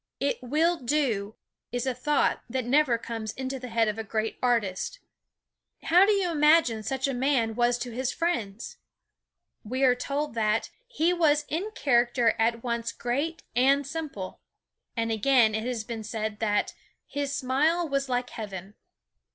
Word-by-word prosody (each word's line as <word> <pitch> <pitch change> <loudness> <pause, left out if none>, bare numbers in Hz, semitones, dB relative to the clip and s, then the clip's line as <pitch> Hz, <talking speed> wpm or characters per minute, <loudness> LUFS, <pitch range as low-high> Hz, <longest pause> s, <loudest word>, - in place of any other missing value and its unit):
It 280 -1 -1
will 315 +7 +1
do 235 -7 -1 0.4
is 245 +1 -2
a 260 - 0
thought 285 +4 +1
that 255 0 -2
never 265 -1 +3
comes 225 -2 -5
into 265 0 -4
the 250 - -7
head 225 -1 +2
of 215 +1 -2
a - - -2
great 220 +1 -3
artist. 235 - 0 0.9
How 360 +4 +5
do - - +5
you 380 -3 +1
imagine 300 -7 +4
such 265 +4 -1
a 275 - -1
man 245 -3 +1
was 240 +1 +2
to 245 0 -5
his 255 +2 -2
friends? 235 - -3 0.9
We 255 +5 -2
are 255 -2 +6
told 280 +3 -3
that, 220 -1 0 0.2
"he 355 -8 +1
was 300 -4 +3
in 355 +8 -2
character 240 -2 +3
at 230 +1 +1
once 235 -1 -2
great 285 +7 -2
and 275 +3 +4
simple." 280 - -6 0.6
And 230 0 0
again 225 0 +4
it 220 +1 -2
has 245 -3 -2
been 225 0 -6
said 215 -1 -4
that, 210 -2 0 0.3
"his 285 -1 -3
smile 295 +6 +1
was 275 -2 -1
like 250 0 -1
heaven." 195 -3 -7
250 Hz, 160 wpm, -27 LUFS, 225-285 Hz, 0.9 s, are